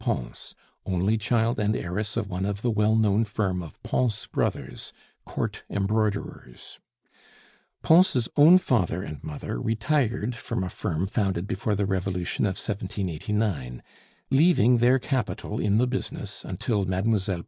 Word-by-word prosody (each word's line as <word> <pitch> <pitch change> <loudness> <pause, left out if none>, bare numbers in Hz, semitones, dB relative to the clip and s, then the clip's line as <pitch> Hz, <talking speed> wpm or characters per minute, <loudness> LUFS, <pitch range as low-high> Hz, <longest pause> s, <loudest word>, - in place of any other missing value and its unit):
Pons, - - -4 0.3
only 95 +4 +1
child 115 +2 +1
and 105 +1 +1
heiress 100 +5 -3
of 110 -3 -1
one 95 -1 -3
of 100 +1 -3
the 120 - +2
well 105 0 +2
known 110 -1 +3
firm 100 -4 -1
of 80 -4 -10
Pons 115 -5 0
Brothers, - - -3 0.3
court - - -4
embroiderers. 100 - -2 1.0
Pons' 160 -8 +4
own 155 +5 +8
father 95 - 0
and 75 -8 -8
mother 75 -5 -5
retired 115 0 0
from 115 -5 -4
a 90 - -4
firm 85 +2 -2
founded 95 -3 -1
before 105 +2 -1
the 100 0 0
Revolution 95 -1 -1
of 95 -2 -1
1789, 95 - -3 0.5
leaving 135 - +5
their 125 +3 +4
capital 120 -5 -2
in 105 0 +2
the 125 - +4
business 125 +1 -4
until 105 -4 -1
Mlle. 95 +4 +1
105 Hz, 135 wpm, -26 LUFS, 95-115 Hz, 1.0 s, own